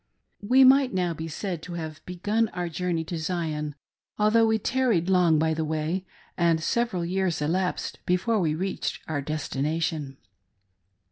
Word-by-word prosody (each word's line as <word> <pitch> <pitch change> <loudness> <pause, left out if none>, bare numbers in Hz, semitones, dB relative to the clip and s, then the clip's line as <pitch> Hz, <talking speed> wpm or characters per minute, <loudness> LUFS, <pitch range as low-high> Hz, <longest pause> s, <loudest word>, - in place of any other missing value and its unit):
We 250 +6 +5
might 260 -3 +5
now 180 -2 +1
be 160 0 -6
said 175 +1 -4
to 175 - -8
have 160 -2 -6
begun 205 +6 0
our 175 -1 -3
journey 170 0 -1
to 165 +1 -5
Zion, 155 -3 -2 0.4
although 225 +2 +4
we 220 0 +3
tarried 220 -6 +1
long 175 -4 +4
by 160 +1 +2
the 160 0 -1
way, 160 +4 -2 0.3
and 170 -2 +2
several 185 0 0
years 185 -1 0
elapsed 180 +5 -1
before 190 +5 +2
we 155 -4 +1
reached 185 +3 -3
our 155 -3 -2
destination. 150 0 -2
175 Hz, 150 wpm, -26 LUFS, 160-190 Hz, 0.4 s, We